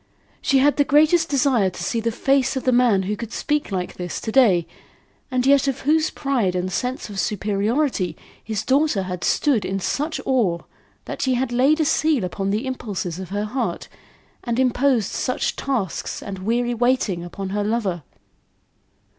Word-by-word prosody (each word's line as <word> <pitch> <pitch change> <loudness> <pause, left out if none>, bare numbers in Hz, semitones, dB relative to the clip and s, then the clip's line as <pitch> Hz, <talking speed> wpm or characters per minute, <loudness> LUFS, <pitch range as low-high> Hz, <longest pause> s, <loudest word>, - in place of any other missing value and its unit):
She 275 - +2
had 285 +2 +3
the 290 - +5
greatest 310 +4 +4
desire 260 -8 +2
to 175 -1 -7
see 230 +6 -1
the 230 +1 -1
face 270 +3 +1
of 265 - -2
the 255 - +2
man 240 -6 +3
who 205 +3 -2
could 230 +1 -7
speak 295 -3 -1
like 180 -2 -3
this 180 -1 -4
to 220 - -4
day, 205 -10 +4 0.6
and 255 -1 0
yet 280 0 +4
of 270 - -1
whose 310 +2 +2
pride 245 -10 -1
and 180 +1 -2
sense 250 +6 -2
of 195 - -5
superiority 210 - 0 0.3
his 215 -2 -3
daughter 270 -7 +2
had 180 -1 -5
stood 270 -9 +2
in 190 +1 -2
such 300 - -2
awe, 230 -11 +2 0.5
that - - -6
she 260 -1 +1
had 250 0 -1
laid 270 +6 +3
a 315 - +2
seal 300 -4 +2
upon 195 +2 -3
the 215 +6 -1
impulses 200 -9 -4
of 190 -2 -7
her 205 +2 -2
heart, 255 +5 -3 0.5
and 235 -1 -2
imposed 255 -3 +2
such 255 - -1
tasks 245 -10 -3
and 195 -2 -6
weary 240 +5 0
waiting 235 -7 +1
upon 190 +2 -6
her 205 +1 -1
lover. 205 -5 -1
235 Hz, 180 wpm, -22 LUFS, 195-270 Hz, 0.6 s, the